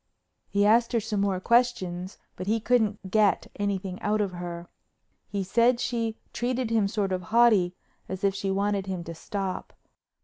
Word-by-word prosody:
He 200 0 +2
asked 230 +3 +4
her 230 - +3
some 210 -2 -2
more 195 -2 +1
questions 190 -6 +1 0.2
but 185 - -6
he 225 +2 +2
couldn't 215 -5 +1
get 210 -4 +2
anything 195 -2 -2
out 210 +1 +1
of 200 -3 0
her. 175 -1 -6 0.6
He 200 -1 -2
said 235 +5 +3
she 230 -3 -1 0.2
treated 245 -1 -1
him 220 -3 +3
sort 200 -2 -1
of 185 -1 -1
haughty 210 -3 +4 0.3
as 190 +1 -5
if 195 -1 +3
she 195 0 -3
wanted 200 0 0
him 185 -2 -3
to 165 - -7
stop. 190 +3 -4
200 Hz, 170 wpm, -27 LUFS, 185-225 Hz, 0.6 s, asked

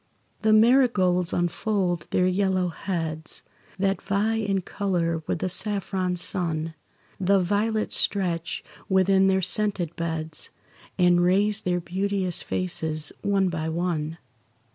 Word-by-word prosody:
The 220 - +3
marigolds 215 -7 +4
unfold 175 0 -1
their 180 - +2
yellow 185 -1 +1
heads, 160 -3 -4 0.3
That 195 +1 0
vie 210 +3 0
in 200 -3 0
colour 175 -4 -1
with - - 0
the 185 - -2
saffron 185 -1 -1
sun; 165 -3 -1 0.5
The 195 +1 +3
violets 210 +4 0
stretch 175 -5 -1 0.3
within 190 0 +4
their 190 0 +2
scented 185 -3 0
beds, 160 -1 -3 0.5
And 175 -1 +4
raise 200 +4 +2
their 180 -1 0
beauteous 185 +1 -1
faces, 160 -4 +1
one 195 -2 +1
by 160 -2 -3
one. 165 -2 -2
185 Hz, 120 wpm, -25 LUFS, 170-200 Hz, 0.5 s, marigolds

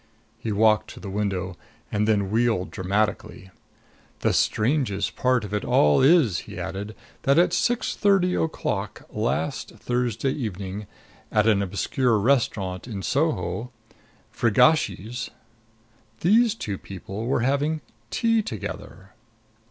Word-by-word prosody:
He 115 -2 -3
walked 110 +1 +3
to - - -10
the 100 - -7
window 95 -3 -2 0.4
and 105 0 +1
then 100 -3 +1
wheeled 110 -5 +1
dramatically. 95 -1 -2 0.7
"The - - +2
strangest 110 -4 +1
part 125 -2 +2
of 105 -1 -6
it 105 - -1
all 75 - +4
is," 135 - +5
he - - -8
added, 105 +3 -5 0.3
"that 140 +2 +3
at 175 - +4
six 240 -1 +1
thirty 195 -3 +3
o'clock 110 -9 -2
last 120 +5 -2
Thursday 125 +1 -1
evening, 100 -5 -5 0.4
at 105 0 +3
an 105 -3 +4
obscure 110 +5 +1
restaurant 105 -5 0
in 100 -5 -5
Soho 115 - -1 0.6
Frigacci's 120 - +2 0.9
these 225 +5 +4
two 100 - -4
people 100 +4 -7
were 125 - +1
having 145 +5 0 0.3
tea 230 -2 +2
together!" 100 - -7
110 Hz, 120 wpm, -25 LUFS, 100-135 Hz, 0.9 s, is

